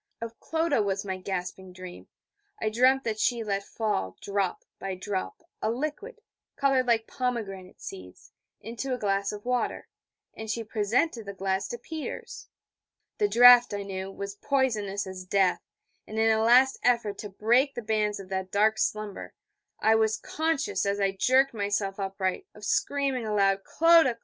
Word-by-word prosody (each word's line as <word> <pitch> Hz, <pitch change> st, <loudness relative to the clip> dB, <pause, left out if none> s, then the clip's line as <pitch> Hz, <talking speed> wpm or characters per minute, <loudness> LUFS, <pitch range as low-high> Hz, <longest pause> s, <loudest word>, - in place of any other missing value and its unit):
Of 230 Hz, 0 st, -7 dB
Clodagh 320 Hz, -6 st, 0 dB
was 195 Hz, 0 st, -2 dB
my 190 Hz, -1 st, -3 dB
gasping 185 Hz, 0 st, -5 dB
dream. 185 Hz, -1 st, -10 dB, 0.5 s
I 220 Hz, -, 0 dB
dreamed 255 Hz, +4 st, +3 dB
that 220 Hz, -2 st, -2 dB
she 235 Hz, +1 st, +1 dB
let 200 Hz, -2 st, -2 dB
fall, 145 Hz, -, -2 dB
drop 200 Hz, -2 st, -2 dB
by 195 Hz, -1 st, -4 dB
drop, 190 Hz, -, -4 dB, 0.2 s
a -, -, 0 dB
liquid, 305 Hz, -, -4 dB, 0.3 s
coloured 270 Hz, -2 st, +2 dB
like 225 Hz, -2 st, +2 dB
pomegranate 205 Hz, -7 st, -4 dB
seeds, 90 Hz, -1 st, -10 dB, 0.3 s
into 235 Hz, +4 st, -4 dB
a -, -, -6 dB
glass 200 Hz, -2 st, 0 dB
of 210 Hz, +1 st, -9 dB
water; 250 Hz, 0 st, -1 dB, 0.4 s
and 220 Hz, 0 st, -8 dB
she 230 Hz, +1 st, -2 dB
presented 225 Hz, +3 st, 0 dB
the 200 Hz, -, -6 dB
glass 190 Hz, +1 st, -1 dB
to 240 Hz, -, -5 dB
Peters. 315 Hz, +5 st, -7 dB, 0.7 s
The 415 Hz, -, +3 dB
draught, 245 Hz, -, +7 dB
I 200 Hz, -, -4 dB
knew, 190 Hz, -1 st, -5 dB
was 200 Hz, +1 st, -6 dB
poisonous 210 Hz, -4 st, -1 dB
as 190 Hz, -1 st, -7 dB
death: 185 Hz, 0 st, +2 dB, 0.5 s
and 215 Hz, -, -7 dB
in 225 Hz, 0 st, +4 dB
a 220 Hz, 0 st, +2 dB
last 250 Hz, +4 st, +5 dB
effort 235 Hz, -5 st, +1 dB
to 210 Hz, -, -6 dB
break 240 Hz, +8 st, +2 dB
the 240 Hz, -, -5 dB
bands 210 Hz, -1 st, 0 dB
of 190 Hz, -1 st, -10 dB
that 190 Hz, -1 st, -3 dB
dark 215 Hz, +2 st, +2 dB
slumber, 215 Hz, -2 st, -3 dB, 0.5 s
I 220 Hz, -, +5 dB
was 220 Hz, 0 st, +2 dB
conscious, 325 Hz, +5 st, -1 dB
as 200 Hz, 0 st, 0 dB
I 195 Hz, -1 st, +2 dB
jerked 260 Hz, +7 st, +3 dB
myself 205 Hz, -2 st, -2 dB
upright, 195 Hz, -, -2 dB
of -, -, -9 dB
screaming 275 Hz, -5 st, 0 dB
aloud: 195 Hz, -2 st, +2 dB
'Clodagh! 330 Hz, -7 st, +4 dB
215 Hz, 165 wpm, -27 LUFS, 195-245 Hz, 0.7 s, draught